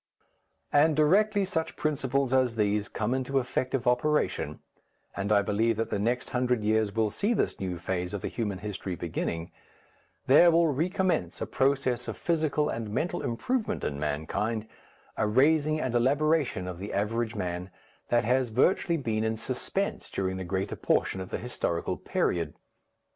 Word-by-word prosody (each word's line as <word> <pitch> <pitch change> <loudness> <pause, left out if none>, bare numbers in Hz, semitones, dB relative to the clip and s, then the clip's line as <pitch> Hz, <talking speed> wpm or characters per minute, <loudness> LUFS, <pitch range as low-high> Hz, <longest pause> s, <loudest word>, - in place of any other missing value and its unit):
And 150 +2 +5
directly 200 +7 +3
such 165 -4 -2
principles 140 -3 0
as 130 -3 +3
these 105 -1 +1
come 120 - -1
into 130 +1 -1
effective 130 0 -1
operation, 125 +5 +1 0.6
and 100 +1 -2
I 100 -1 +5
believe 110 +2 +1
that 115 - -2
the - - 0
next 120 +4 -1
hundred 125 -3 +1
years 110 -1 +1
will 110 -2 +1
see 210 - 0
this - - -1
new 90 -2 -3
phase 90 +1 -3
of 100 - -4
the - - -1
human 105 -5 -3
history 95 -3 -4
beginning, 85 0 -3 0.7
there 150 +6 +7
will 165 -1 +4
recommence 175 - 0
a - - -2
process 130 +2 0
of - - -4
physical 155 -3 +1
and 115 -6 -3
mental 170 +11 -1
improvement 220 - -1
in 70 -1 -2
mankind, 80 +10 -2 0.5
a 110 - +1
raising 150 +6 +3
and 130 -5 -2
elaboration 140 - +2
of 90 -1 -6
the 100 +2 -6
average 110 +3 -1
man, 90 -2 -3 0.4
that 120 -1 +3
has 125 +2 +2
virtually 165 - +2
been 110 -6 -1
in 110 0 -1
suspense 135 - -3
during 95 -1 -2
the 95 - -4
greater 95 +2 -2
portion 95 - 0
of 95 - -7
the - - -2
historical 110 -8 -2
period. 85 -4 -1
120 Hz, 160 wpm, -28 LUFS, 100-145 Hz, 0.7 s, there